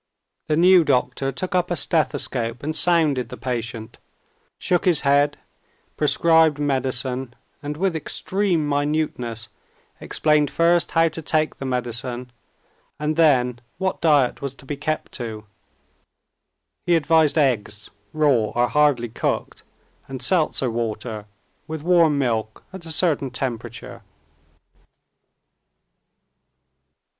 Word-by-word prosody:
The 155 - +1
new 180 +1 +6
doctor 135 0 0
took 185 +9 -5
up 180 -1 +1
a 175 - 0
stethoscope 135 -8 -1
and 155 +2 -3
sounded 155 -10 +2
the - - -8
patient, 115 -2 -5 0.6
shook 180 +1 0
his 175 -5 +4
head, 145 +1 +2 0.6
prescribed 160 0 +4
medicine, 130 -3 -1 0.3
and 150 0 -5
with 185 0 0
extreme 175 0 -1
minuteness 145 -6 -2 0.5
explained 150 -2 +1
first 170 +2 +2
how 165 0 +5
to 160 +1 -6
take 155 0 0
the 135 - -6
medicine 125 0 -3 0.7
and 150 +1 -2
then 125 -7 +3 0.2
what 190 +1 -2
diet 145 -6 +2
was 140 -1 -5
to 135 - -17
be 145 - -4
kept 155 +2 -3
to. 110 -4 -6 1.4
He 175 - +4
advised 160 -1 +3
eggs, 105 -8 0 0.2
raw 145 -8 +2
or 120 0 +2
hardly 145 -6 +2
cooked, - - -3 0.5
and 135 -1 -7
seltzer 150 -5 +1
water, 110 -2 -4 0.4
with 160 -1 -6
warm 165 -4 +4
milk 110 -5 -2
at 180 -3 -9
a - - -2
certain 155 -4 +1
temperature. 120 -2 -6
145 Hz, 115 wpm, -22 LUFS, 125-160 Hz, 1.4 s, new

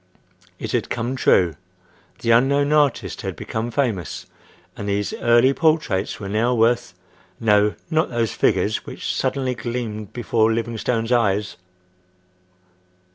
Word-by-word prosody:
It - - -5
had - - -1
come 120 +3 -2
true. 90 -9 +3 0.7
The 115 - +1
unknown 140 +5 +3
artist 145 -4 +1
had - - -4
become 110 +2 -4
famous, 115 - -2 0.5
and 100 - -5
these 100 0 -1
early 120 +3 +4
portraits 155 - 0
were 100 - -6
now 115 +5 +1
worth—no, 110 -3 0 0.2
not 160 +1 +2
those 115 -3 -1
figures - - +1
which - - -4
suddenly 130 -2 -1
gleamed 115 -4 -5
before 115 -2 +1
Livingstone's 115 0 -2
eyes! 105 -4 +1
115 Hz, 120 wpm, -22 LUFS, 105-125 Hz, 0.7 s, early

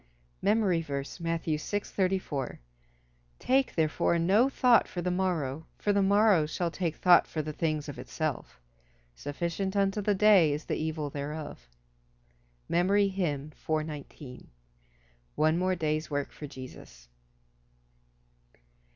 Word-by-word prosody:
MEMORY 200 -5 +2
VERSE, 140 0 -5
Matthew 165 -2 -1
6: 205 +6 -3
34 185 -9 -1 0.8
"Take 265 +1 +1
therefore 160 +1 +1
no 200 +10 +3
thought 250 -3 +4
for 180 - -6
the 180 +1 -1
morrow, 165 -6 -1
for 205 - 0
the 200 - +3
morrow 200 -4 +4
shall 170 +2 -2
take 170 -3 -2
thought 180 -1 +5
for 155 - -3
the 155 +1 -5
things 155 -1 -1
of 145 - -7
itself. 155 - -4 0.5
Sufficient 170 - -3
unto 200 +1 +1
the 205 0 +1
day 195 -6 +5
is 150 +2 -5
the - - -2
evil 155 -2 -3
thereof." 145 - -6 1.0
MEMORY 195 +4 +3
HYMN 155 -6 -3 1.8
_"One 155 +2 +2
more 185 0 +1
day's 155 -2 -1
work 145 -1 -2
for 150 - -8
Jesus." 130 - -11
165 Hz, 125 wpm, -29 LUFS, 150-195 Hz, 1.8 s, thought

